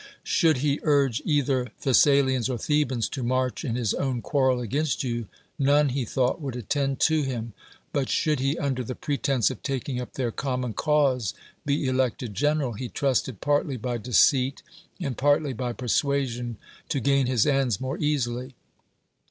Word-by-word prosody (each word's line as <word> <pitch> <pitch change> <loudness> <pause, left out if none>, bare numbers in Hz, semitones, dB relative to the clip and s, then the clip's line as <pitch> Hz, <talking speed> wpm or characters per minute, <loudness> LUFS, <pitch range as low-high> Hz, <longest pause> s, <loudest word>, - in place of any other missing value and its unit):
Should 160 -6 +3
he 145 0 +1
urge 140 -6 +2
either 140 -4 +1 0.2
Thcs 135 -3 +5
salians 130 -3 +3
or 125 - -1
Thebans 135 -3 0
to 135 - -5
march 130 +3 -1
in 120 -6 -2
his 120 -4 0
own 130 -3 -1
quarrel 130 -3 +2
against 140 +6 -1
you, 120 -3 -3 0.3
none, 145 +1 +4
he 130 -1 -2
thought, 130 +7 0
would 135 -4 -4
attend 135 +3 0
lo 160 -1 +2
him: 120 -5 -4 0.4
but 140 -2 0
should 155 -4 +1
he, 135 +4 0
under 135 -4 -1
the 125 +2 -5
pretense 140 -4 0
of - - -9
taking 135 -2 -3
up 125 - -8
their 125 -3 -2
common 125 -2 -2
cause, 130 - +1 0.3
be 145 0 +1
elected 130 -3 -1
general, 145 0 0
he 120 +3 -5
tinisted 130 -5 -1
partly 145 -2 +1
by 120 +1 -3
deceit 125 +3 +3 0.4
and 130 -4 -4
partly 145 0 +2
by 125 0 -3
persuj; 135 +3 0
sion 120 -1 -5 0.3
to 140 - 0
gain 140 0 +2
his 125 -4 +2
ends 135 -7 +1
more 130 +4 -4
easily. 130 -4 -1
130 Hz, 170 wpm, -26 LUFS, 125-140 Hz, 0.4 s, Thcs